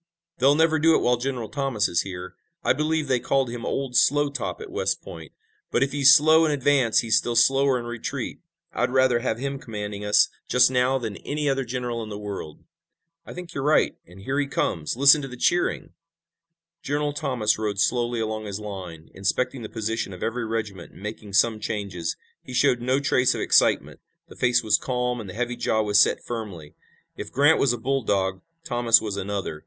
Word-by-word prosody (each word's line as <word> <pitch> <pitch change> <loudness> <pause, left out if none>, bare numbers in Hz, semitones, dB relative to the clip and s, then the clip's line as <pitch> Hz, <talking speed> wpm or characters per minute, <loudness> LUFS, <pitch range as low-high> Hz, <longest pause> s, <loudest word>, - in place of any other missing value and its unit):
"They'll 135 +3 +4
never 160 0 +3
do 160 +1 +4
it - - +5
while 125 0 +2
General 125 -2 -3
Thomas 135 -4 -1
is 85 - +1
here. 90 -1 -7 0.3
I - - +3
believe 155 0 -1
they 130 -2 +1
called 135 -1 0
him 120 -1 -6
'Old 135 -2 -3
Slow 145 +3 +3
Top' 140 - -4
at 440 -4 -9
West 465 +6 -2
Point, - - -10 0.4
but - - +2
if 135 - -2
he's 140 -1 +6
slow 155 +3 +6
in 160 - +2
advance 140 -5 +2
he's 115 -2 +1
still 120 - -1
slower 135 +1 +4
in 120 - -6
retreat. 120 +2 -5 0.3
I'd 125 - 0
rather 130 -2 +3
have 115 -2 -2
him 140 +2 -4
commanding 105 -4 -6
us 105 0 +4 0.2
just 125 +1 +4
now 125 +1 +2
than 110 -5 -5
any 150 0 -3
other 135 -1 +1
general 120 -1 -4
in 110 - -7
the 105 - -6
world." 100 -7 -7 0.6
"I - - -9
think 175 -1 -9
you're 135 - -3
right, 150 +2 +2
and 90 +3 -14
here 135 +7 -2
he 145 - 0
comes! 85 - -2
Listen 140 +3 +6
to 135 - -5
the 125 -1 -10
cheering!" 175 +7 0 0.9
General 145 +1 -2
Thomas 125 -9 0
rode 105 -2 -2
slowly 120 +1 +1
along 110 -1 -3
his 100 -1 -5
line, 95 -6 -8
inspecting 125 +6 -1
the 110 - -7
position 110 -2 -3
of 90 - -8
every 115 0 -2
regiment 105 -5 -5
and - - -14
making 105 -1 -7
some 110 +3 +3
changes. 100 -6 -4 0.2
He 125 - -9
showed 125 -2 +2
no 130 +3 +1
trace 130 -3 +2
of - - -3
excitement. - - +2 0.3
The - - -13
face 125 -1 +2
was 110 -2 +2
calm 125 -1 -2
and 100 - -9
the 90 - -9
heavy 120 +1 -2
jaw 110 -2 0
was 105 -1 +3
set - - +3
firmly. 100 -11 -7 0.4
If - - -7
Grant 145 +4 +4
was 135 - +3
a 120 - -2
bulldog 105 -7 -1 0.2
Thomas 120 -5 +3
was 105 -3 -4
another. 100 -5 -4
120 Hz, 200 wpm, -24 LUFS, 105-135 Hz, 0.9 s, he's